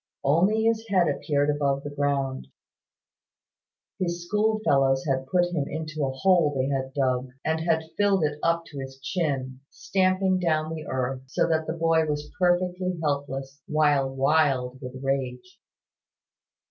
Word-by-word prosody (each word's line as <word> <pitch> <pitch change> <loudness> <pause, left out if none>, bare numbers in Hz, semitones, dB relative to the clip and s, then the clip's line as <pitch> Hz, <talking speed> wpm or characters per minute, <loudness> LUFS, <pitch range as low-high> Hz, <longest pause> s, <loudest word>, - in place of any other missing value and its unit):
Only 185 +10 +3
his 225 0 +1
head 185 -5 +3
appeared 145 -1 +1
above 140 -1 0
ground. 140 - -1 1.5
His 175 -1 -2
schoolfellows 175 -11 +2
had 135 -2 -1
put 175 +2 +2
him 145 -5 -1
into 155 0 -4
a 135 - +1
hole 160 0 +3
they 135 0 0
had 135 0 -3
dug, 130 -2 0 0.2
and 160 0 +1
had 160 -1 +1 0.2
filled 200 -4 +3
it 150 0 -1
up 170 0 +1
to 140 - -7
his 135 0 -7
chin, 135 -4 -2
stamping 185 0 +1
down 160 -2 0
the 155 -2 -7
earth, 130 0 -2
so 130 - +1
that 160 -1 0
the - - -1
boy 165 -1 +2
was 150 0 -3
perfectly 180 0 +1
helpless, 140 -1 -3
while 145 -3 +2
wild 135 -2 +1
with 125 -1 -7
rage. 135 +7 -3
150 Hz, 145 wpm, -26 LUFS, 135-175 Hz, 1.5 s, Only